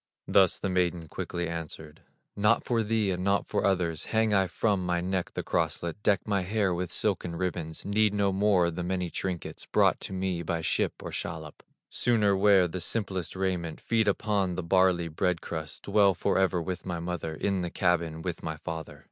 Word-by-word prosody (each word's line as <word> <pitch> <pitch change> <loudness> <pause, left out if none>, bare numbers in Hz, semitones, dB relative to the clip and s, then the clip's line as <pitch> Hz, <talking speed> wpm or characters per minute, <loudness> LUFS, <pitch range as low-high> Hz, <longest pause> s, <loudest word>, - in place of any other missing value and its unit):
Thus 95 -3 +4
the - - -3
maiden 90 -3 0
quickly 85 +2 -4
answered: 80 -2 -7 0.3
"Not 105 +3 +3
for 115 -2 +1
thee 110 -2 +1
and 90 0 -2
not 100 +1 +2
for - - -1
others, 90 -5 0
Hang 110 -1 +1
I 95 -2 +3
from 100 +2 0
my 90 -1 0
neck 90 0 -2
the - - -2
crosslet, 85 +4 -1
Deck 100 -1 +1
my 100 -2 +1
hair 100 0 0
with 90 0 -3
silken 90 -5 0
ribbons; 85 -3 -3
Need 105 +1 +3
no 100 -1 +2
more 95 -3 +3
the 85 +2 -4
many 90 -1 -2
trinkets 90 -3 -4
Brought - - +3
to - - -6
me 95 -2 -2
by 85 -1 -2
ship 75 - -1
or - - -5
shallop; 80 -2 -6 0.3
Sooner 105 -5 +3
wear 95 -2 +5
the 90 +2 -5
simplest 95 -2 -2
raiment, 90 -4 -2
Feed 115 -2 +1
upon 100 -3 +1
the 90 - -3
barley 90 -1 +3
bread 90 +2 0
crust, 80 -2 -6
Dwell 100 -2 +4
forever 95 +1 +1
with 90 0 -4
my 90 -2 -3
mother 85 -2 -4
In 95 +2 0
the 90 - -2
cabin 85 -3 0
with 90 -3 -4
my 80 -1 -4
father." 80 0 -6
90 Hz, 190 wpm, -28 LUFS, 85-100 Hz, 0.3 s, wear